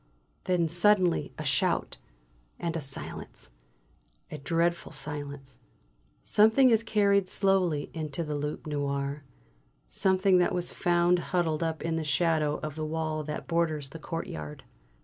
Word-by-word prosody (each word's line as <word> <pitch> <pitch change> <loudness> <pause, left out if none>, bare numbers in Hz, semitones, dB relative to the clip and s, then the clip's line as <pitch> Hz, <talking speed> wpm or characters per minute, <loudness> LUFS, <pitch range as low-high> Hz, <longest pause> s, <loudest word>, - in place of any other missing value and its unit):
Then 180 -2 +2
suddenly 180 +1 +3
a - - -5
shout; - - 0 0.6
and 170 -1 -2
a 165 - -2
silence, 135 - -4 0.8
a 150 - -6
dreadful 170 +4 0
silence. 145 -3 -7 0.6
Something 220 +5 +5
is 225 -1 +4
carried 200 -3 +2
slowly 185 -8 +1
into 155 0 -4
the 150 -1 -4
"Loup 150 +1 -4
Noir." 140 -1 -2 0.7
Something 190 - +3
that 180 0 +2
was 180 -1 -1
found 175 0 +2
huddled 170 -3 -1
up 160 -1 -2
in 165 0 -1
the 160 - -2
shadow 150 0 +1
of 155 -1 -3
the 155 +1 -5
wall 155 0 -2
that 150 - -5
borders 160 -5 0
the 165 - -8
courtyard. 75 - -6
160 Hz, 135 wpm, -28 LUFS, 150-180 Hz, 0.8 s, Something